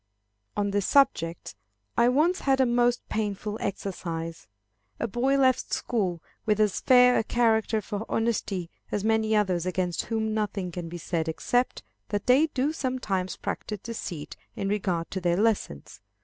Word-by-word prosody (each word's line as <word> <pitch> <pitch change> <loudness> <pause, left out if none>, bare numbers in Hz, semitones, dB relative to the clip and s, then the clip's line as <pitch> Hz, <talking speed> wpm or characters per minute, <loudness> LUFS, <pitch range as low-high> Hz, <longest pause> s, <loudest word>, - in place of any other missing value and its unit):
On 205 -1 +1
this 200 -1 0
subject, 170 - +2 0.4
I 235 +1 +5
once 315 +8 +3
had 270 -1 +2
a 260 - +5
most 240 0 +2
painful 210 0 -2
experience. 170 -5 -4 0.5
A 230 - 0
boy 255 +5 +1
left 260 -2 +2
school 185 -8 -1 0.2
with 215 -1 +1
as 210 -3 +2
fair 250 -1 +6
a - - 0
character 220 -1 +2
for 210 +2 -5
honesty 205 -6 -1 0.2
as 205 - -1
many 220 0 +2
others 185 -4 +1
against 180 -1 -1
whom 220 -1 -1
nothing 205 -4 -2
can 170 -1 -5
be 175 - -6
said 165 -1 -2
except 245 +10 0 0.3
that 205 -1 -2
they 270 +6 +5
do 280 +1 -1
sometimes 250 -10 -2
practise 210 -3 -4
deceit 180 -9 -6 0.2
in 195 - -2
regard 185 -5 -1
to 190 - -3
their 175 0 +2
lessons. 205 - -1
210 Hz, 155 wpm, -27 LUFS, 185-240 Hz, 0.5 s, fair